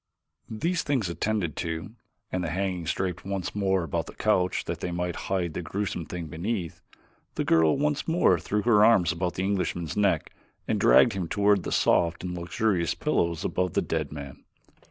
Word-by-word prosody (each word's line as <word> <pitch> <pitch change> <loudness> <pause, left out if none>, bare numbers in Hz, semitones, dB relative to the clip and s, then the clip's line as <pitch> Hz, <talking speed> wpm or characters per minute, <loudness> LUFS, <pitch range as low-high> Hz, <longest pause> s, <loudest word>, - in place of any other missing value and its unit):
These 165 +10 -1
things 130 -10 0
attended 90 -3 -1
to, 85 +3 -4 0.4
and 90 -1 -1
the 85 - -2
hangings 90 -2 -1
draped 90 -1 -3
once 95 -2 -3
more 95 -3 +1
about 80 - -2
the - - -10
couch 90 -1 +1
that - - -4
they 90 - -3
might 90 0 -2
hide 90 -4 0
the - - -3
gruesome 90 -1 -3
thing 90 -2 -5
beneath, 85 +3 -4 0.5
the - - 0
girl 80 - +4
once 150 0 0
more 165 - +3
threw 105 +6 -1
her 105 -3 +5
arms 100 -7 +5
about 85 +1 -2
the 95 - -2
Englishman's 90 -5 -1
neck 95 -6 +1 0.3
and - - 0
dragged - - +6
him 95 -3 -3
toward 100 +2 +3
the - - -5
soft 85 0 +2
and 90 -1 -3
luxurious 90 0 0
pillows 85 -1 0
above 90 -2 -1
the - - +2
dead - - -2
man. 70 -2 -9
90 Hz, 180 wpm, -27 LUFS, 85-100 Hz, 0.5 s, dragged